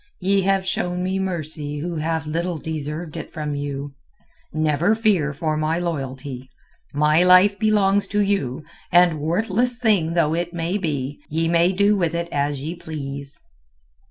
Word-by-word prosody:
"Ye 195 +1 +2
have 195 0 +1
shown 180 -1 -1
me 190 +1 -1
mercy 155 -5 -3
who 165 +3 -4
have 160 +1 -1
little 170 +3 -2
deserved 155 +1 -5
it - - -6
from 150 -2 -4
you. 145 0 -4 0.6
Never 155 +6 +2
fear 200 -10 +2
for 155 +2 -2
my 155 +2 0
loyalty. 135 -6 -4 0.4
My 150 +3 +3
life 185 +3 +6
belongs 205 -2 +3
to 210 - +1
you, 160 -9 -1 0.3
and 175 -2 +5
worthless 215 +10 0
thing 200 -9 +2
though 160 -2 +2
it 175 +1 -2
may 175 +4 -1
be, 145 -5 -3
ye 165 +2 0
may 170 +2 +3
do 200 +2 +3
with 170 -4 0
it 170 0 -2
as 145 -1 -1
ye 160 +3 -3
please." 140 -4 -7
165 Hz, 155 wpm, -22 LUFS, 150-190 Hz, 0.6 s, life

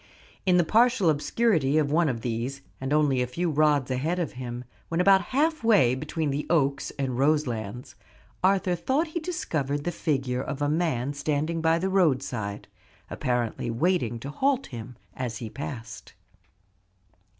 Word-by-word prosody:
In 180 -1 +5
the 175 - +5
partial 225 -2 +4
obscurity 155 - +1
of 145 -2 +2
one 165 0 +3
of 115 -3 -3
these, 125 +4 -3 0.2
and 135 +1 -3
only 145 -4 +3
a 125 - 0
few 165 +7 -1
rods 145 -3 +2
ahead 150 +8 0
of 170 -6 -2
him, 125 -1 -6 0.3
when 165 - -1
about 190 0 +5
half 310 +2 +1
way 200 - +5
between 150 +2 -2
the 145 +2 -3
Oaks 140 -4 +1
and 130 -3 -2
Roselands, 125 -5 0 0.5
Arthur 190 -1 +3
thought 270 - 0
he 340 - -3
discovered 155 - -2
the 175 - -1
figure 130 -6 -1
of 140 +1 -5
a 145 - +1
man 145 -4 0
standing 155 +3 -1
by 165 0 +3
the 185 +3 -1
roadside, 130 - 0 0.4
apparently 120 -2 -1
waiting 120 -1 +1
to 140 - -5
halt 270 - +1
him 120 -1 -8 0.2
as 125 -3 -3
he 115 -4 -7
passed. 120 -5 -7
145 Hz, 160 wpm, -26 LUFS, 125-175 Hz, 0.5 s, In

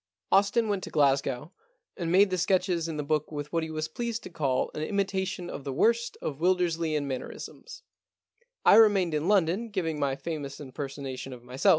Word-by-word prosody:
Austin 205 +4 +4
went 200 -3 -1
to - - -5
Glasgow, 140 0 +1 0.4
and 170 -2 -2
made 195 +2 +5
the 185 - +1
sketches 180 -2 +1
in 160 -2 -4
the 150 - -2
book 155 +1 -1
with 145 0 -6
what 165 - +2
he 160 - -4
was 155 0 -3
pleased 235 +6 -4
to - - -9
call 140 -6 0
an 150 - -4
imitation 190 0 -1
of 140 - -6
the 140 - -4
worst 230 - +1
of 140 -2 -3
the - - -16
Wildersleian 165 -5 +1
mannerisms. 475 - -7 0.8
I - - +8
remained 200 -6 +5
in 150 +2 0
London 200 +3 +2
giving 165 -7 -2
my 140 -2 +1
famous 140 -1 -5
impersonation 135 -1 -6
of 120 -1 -11
myself. 125 +2 +1
165 Hz, 190 wpm, -28 LUFS, 145-190 Hz, 0.8 s, I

